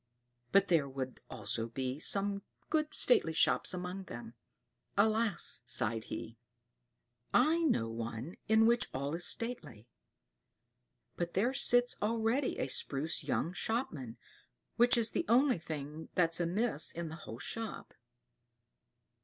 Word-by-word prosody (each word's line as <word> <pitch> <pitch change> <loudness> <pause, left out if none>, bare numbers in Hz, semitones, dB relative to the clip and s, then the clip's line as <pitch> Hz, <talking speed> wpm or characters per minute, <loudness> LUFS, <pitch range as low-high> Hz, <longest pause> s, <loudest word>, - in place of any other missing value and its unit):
But 200 0 +5
there 155 -5 +2
would 130 -1 -5
also 115 0 -3
be 130 +3 -4
some 200 +3 +1 0.3
good 310 -1 +1
stately 165 -10 +6
shops - - +3
among 180 +1 -4
them. 120 -4 -9 0.6
Alas!" 215 - +1
sighed 115 -2 0
he, 115 0 -7 1.0
"I 325 +2 +4
know 260 - +1
one 115 +7 -6
in 220 +1 +5
which 235 +1 +2
all 140 +3 -2
is 170 +1 -1
stately; 150 - -4 1.3
but 175 -1 -3
there 235 +7 +2
sits 245 -2 +3
already 230 +5 0
a - - -1
spruce 145 +3 -1
young 170 - -1
shopman, 170 - -3 0.6
which 240 +1 +5
is 230 -1 +2
the 340 - -1
only 255 -3 +4
thing 155 -1 -7
that's 165 -2 +3
amiss 175 +1 +1
in 170 -1 -5
the 160 - -8
whole 115 -7 -9
shop. 225 - -5
175 Hz, 130 wpm, -33 LUFS, -, 1.3 s, stately